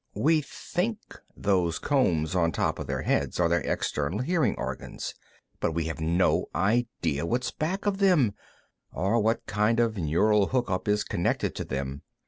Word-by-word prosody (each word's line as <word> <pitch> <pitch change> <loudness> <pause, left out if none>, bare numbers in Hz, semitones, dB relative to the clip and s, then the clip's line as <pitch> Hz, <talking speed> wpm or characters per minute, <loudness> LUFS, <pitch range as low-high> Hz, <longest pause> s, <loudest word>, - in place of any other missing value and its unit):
We 155 +1 +3
think 185 +9 -3 0.4
those 90 -5 +1
combs 90 - +1
on 85 -2 +2
top - - 0
of - - -5
their - - -2
heads - - 0
are 85 - +4
their 85 0 +2
external 75 +6 -1
hearing 155 - +1
organs, - - -5 0.5
but 80 - 0
we 85 +1 0
have 80 -1 -4
no 85 +3 +2
idea 95 -7 0
what's 120 +8 -1
back 185 +7 -3
of 200 -1 0
them, 170 - +4 0.6
or 100 +5 +1
what 110 +1 +1
kind 105 +3 +1
of 115 -2 +1
a - - -2
neural 100 +6 +3
hookup 120 -8 -1
is 105 0 +2
connected 85 - -1
to - - -5
them. 65 +1 -4
105 Hz, 165 wpm, -27 LUFS, 85-125 Hz, 0.6 s, are